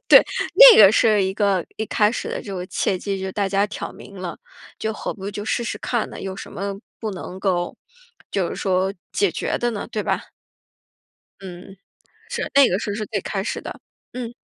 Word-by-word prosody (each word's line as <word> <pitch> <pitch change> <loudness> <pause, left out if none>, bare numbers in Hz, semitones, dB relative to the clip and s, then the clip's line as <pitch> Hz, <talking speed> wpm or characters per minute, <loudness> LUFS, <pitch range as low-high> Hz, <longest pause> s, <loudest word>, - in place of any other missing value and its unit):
对， - - +9 0.3
那 - - +10
个 205 -1 +9
是 215 -3 +4
一 190 0 0
个 200 -4 +1
一 220 - -3
开 210 0 +3
始 - - -4
的 - - -4
这 200 -2 -6
个 180 0 -5
契 185 0 -1
机， 195 0 -3
就 190 - -5
是 190 - -5
大 200 -2 0
家 200 +1 +2
挑 210 - -6
明 200 - -13
了， 175 -3 -5 0.4
就 220 0 -2
何 - - -5
不 200 -1 -6
就 205 +1 -6
试 235 - -1
试 - - -4
看 240 -3 -1
呢， - - -8
有 190 0 -5
什 - - -8
么 200 0 -4 0.2
不 220 -2 -3
能 185 0 -7
够 175 -3 0 0.6
就 185 -4 0
是 - - -5
说 190 0 0 0.2
解 200 -3 +2
决 - - -2
的 240 0 0
呢， 210 - -5
对 215 - -2
吧？ - - -1 1.2
嗯， 185 0 -10 0.5
是， 475 -1 -3
那 280 -2 +8
个 185 +3 0
时 215 - -4
候 205 - -2
是 215 -1 -3
最 205 -1 -2
开 195 -2 -3
始 - - -3
的。 - - -8 0.3
嗯。 240 -1 -5
200 Hz, 230 characters per minute, -22 LUFS, 190-215 Hz, 1.2 s, 那